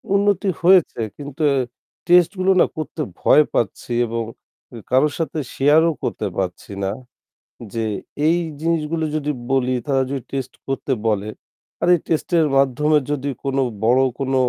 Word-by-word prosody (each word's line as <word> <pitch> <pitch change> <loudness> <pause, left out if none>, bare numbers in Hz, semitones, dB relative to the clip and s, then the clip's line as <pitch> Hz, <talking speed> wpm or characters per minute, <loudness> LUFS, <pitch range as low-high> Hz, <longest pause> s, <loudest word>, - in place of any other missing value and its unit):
উন্নতি 200 -1 +2
হয়েছে 180 -7 +4 0.2
কিন্তু 145 +1 -8
আ - - +1 0.5
টেস্টগুলো 180 +2 +4
না - - +6
করতে 155 0 -4 0.2
ভয় 150 - +6
পাচ্ছি 120 - -2 0.2
এবং 115 +1 -2 0.5
উ - - -9 0.2
কারো 130 +4 +4
সাথে 160 -1 -2 0.2
শেয়ারও 155 +4 +4
করতে 105 - -2
পারছি 95 +1 -3
না। 95 - 0 0.8
যে 115 -1 -1 0.4
এই 165 +2 +4 0.2
জিনিসগুলো 165 0 0
যদি 150 -1 -2 0.2
বলি 130 -1 +2
তারা 135 -2 +2
যদি 135 -2 -3
টেস্ট 135 -2 -4
করতে 135 0 -2
বলে, 105 -1 0 0.5
আর - - +1
এই 175 - +1
টেস্টের 165 0 +2
মাধ্যমে 150 +3 +3
যদি 145 -1 -2 0.2
কোন 135 -1 -1 0.3
বড় 125 +3 +4 0.2
কোন 135 -1 -1
145 Hz, 145 wpm, -21 LUFS, 130-165 Hz, 0.8 s, না